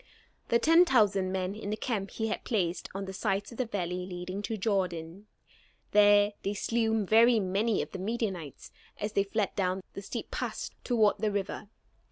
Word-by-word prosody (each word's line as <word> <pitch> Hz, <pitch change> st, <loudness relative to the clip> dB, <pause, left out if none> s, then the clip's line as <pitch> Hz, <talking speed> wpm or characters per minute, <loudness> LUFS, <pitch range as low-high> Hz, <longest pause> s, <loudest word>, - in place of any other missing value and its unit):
The 235 Hz, -, +4 dB
ten 330 Hz, +7 st, +6 dB
thousand 205 Hz, -, +3 dB
men 185 Hz, 0 st, -2 dB
in 210 Hz, -1 st, -6 dB
the 215 Hz, -, -2 dB
camp 210 Hz, -6 st, -2 dB
he 220 Hz, -, -3 dB
had -, -, -3 dB
placed 185 Hz, -7 st, -1 dB
on 195 Hz, 0 st, -3 dB
the 190 Hz, -, -6 dB
sides 200 Hz, +1 st, -1 dB
of 235 Hz, -, -11 dB
the 255 Hz, -, 0 dB
valley 180 Hz, -3 st, -3 dB
leading 185 Hz, +2 st, -5 dB
to 220 Hz, +2 st, -3 dB
the -, -, -8 dB
Jordan. 185 Hz, -2 st, -2 dB, 0.6 s
There 205 Hz, 0 st, +5 dB
they 200 Hz, +1 st, -2 dB
slew 225 Hz, 0 st, 0 dB
very 230 Hz, +3 st, +5 dB
many 200 Hz, +3 st, +1 dB
of -, -, -11 dB
the 190 Hz, -, -6 dB
Midianites 195 Hz, -, -4 dB, 0.3 s
as 210 Hz, +1 st, -3 dB
they 200 Hz, -, +3 dB
fled 205 Hz, 0 st, -1 dB
down 185 Hz, -1 st, -1 dB
the 195 Hz, -, -6 dB
steep 195 Hz, -, -6 dB
pass -, -, -4 dB
toward 220 Hz, -5 st, +2 dB
the 215 Hz, 0 st, +1 dB
river. 200 Hz, 0 st, -3 dB
205 Hz, 190 wpm, -29 LUFS, 190-220 Hz, 0.6 s, ten